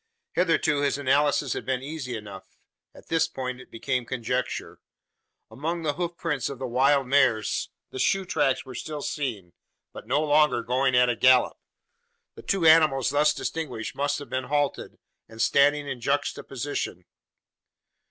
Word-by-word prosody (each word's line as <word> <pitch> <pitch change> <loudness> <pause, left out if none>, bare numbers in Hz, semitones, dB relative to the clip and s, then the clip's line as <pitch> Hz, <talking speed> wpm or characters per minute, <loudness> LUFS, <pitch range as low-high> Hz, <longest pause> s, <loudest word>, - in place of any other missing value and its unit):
Hitherto 165 -4 +2
his 140 -1 +1
analysis 145 0 +2
had - - -5
been 130 -1 -2
easy 135 -5 -5
enough. 100 -3 -11 0.4
At - - -16
this 160 -1 +2
point 130 -4 -5
it - - -15
became 125 +2 -2
conjecture. 125 +1 -3 0.7
Among 165 +8 -3
the 150 -2 0
hoof 175 +1 -4
prints 150 -8 -2
of 140 - -6
the 130 - -5
wild 135 +3 +3
mares, 125 -5 +2 0.2
the 130 - -6
shoe 195 +5 +1
tracks 145 -7 0
were 130 - -9
still 150 +4 -6
seen, 110 - -4 0.4
but - - -10
no 135 +5 +2
longer 150 -5 +3
going 130 +2 +1
at 125 0 +5
a 120 - +1
gallop. 130 0 +4 0.7
The - - -12
two 190 -4 0
animals 155 -5 +5
thus 150 +1 +4
distinguished 140 -11 -4
must 145 +1 -1
have 145 - -8
been 130 0 -2
halted, 145 +1 -1 0.3
and 110 - -13
standing 145 +3 +3
in 130 -3 -5
juxtaposition. 140 -7 -3
135 Hz, 155 wpm, -26 LUFS, 125-150 Hz, 0.7 s, at